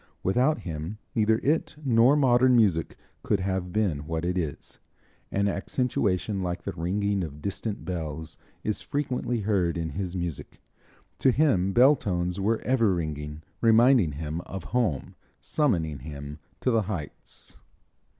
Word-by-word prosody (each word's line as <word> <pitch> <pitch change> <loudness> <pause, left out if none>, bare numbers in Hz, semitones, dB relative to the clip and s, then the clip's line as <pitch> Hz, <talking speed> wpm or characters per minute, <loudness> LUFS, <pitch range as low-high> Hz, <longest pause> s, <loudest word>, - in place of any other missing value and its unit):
Without 130 +11 +2
him 80 +4 -5 0.2
neither 110 -1 +3
it 155 +2 +1
nor 120 +2 +5
modern 130 -2 +4
music 95 -9 +2 0.2
could 100 - +1
have 95 -1 -2
been 85 -9 0
what 80 +1 -2
it 90 +1 0
is. 80 -6 -4 0.5
An 100 +1 +1
accentuation 100 -2 -1
like 90 -1 -3
the - - -3
ringing 100 +3 -1
of 75 -3 -7
distant 100 +4 -4
bells 80 -3 -5 0.2
is 105 - -2
frequently 125 -4 -2
heard 95 -5 +1
in 80 -1 -2
his 95 -1 -4
music. 85 -5 -5 0.6
To 135 - +4
him 125 - +3
bell 130 +8 +6
tones 90 -6 -2
were 110 +3 +1
ever 115 -7 +2
ringing, 75 -2 -4 0.2
reminding 115 - +5
him 80 +3 -4
of 95 -3 -6
home, 110 - 0 0.3
summoning 85 - 0
him 70 +2 -8 0.2
to 130 - +2
the 115 -1 +3
heights. 95 -8 -7
95 Hz, 140 wpm, -27 LUFS, 80-115 Hz, 0.6 s, bell